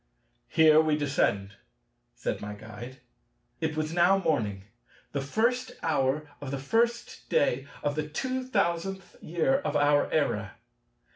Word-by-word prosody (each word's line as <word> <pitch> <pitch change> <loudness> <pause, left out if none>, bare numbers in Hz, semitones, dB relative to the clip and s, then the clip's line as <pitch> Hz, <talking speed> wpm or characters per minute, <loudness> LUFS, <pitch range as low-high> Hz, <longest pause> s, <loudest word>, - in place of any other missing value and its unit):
"Here 155 -1 +6
we 155 -1 +1
descend," 100 -9 0 0.6
said - - -3
my 105 0 -6
Guide. 110 +5 -10 0.6
It 160 -1 -2
was 155 +1 -1
now 175 +3 +5
morning, 105 - -1 0.5
the 140 - -2
first 235 - 0
hour 150 -1 +1
of 140 - -5
the 140 - -2
first 230 - -1
day 135 -1 +1 0.2
of 145 - +1
the 150 0 -3
two 255 - -2
thousandth 190 -5 -1
year 175 - +1
of - - -3
our 145 0 +3
era. 105 -10 0
155 Hz, 135 wpm, -28 LUFS, 135-190 Hz, 0.6 s, Here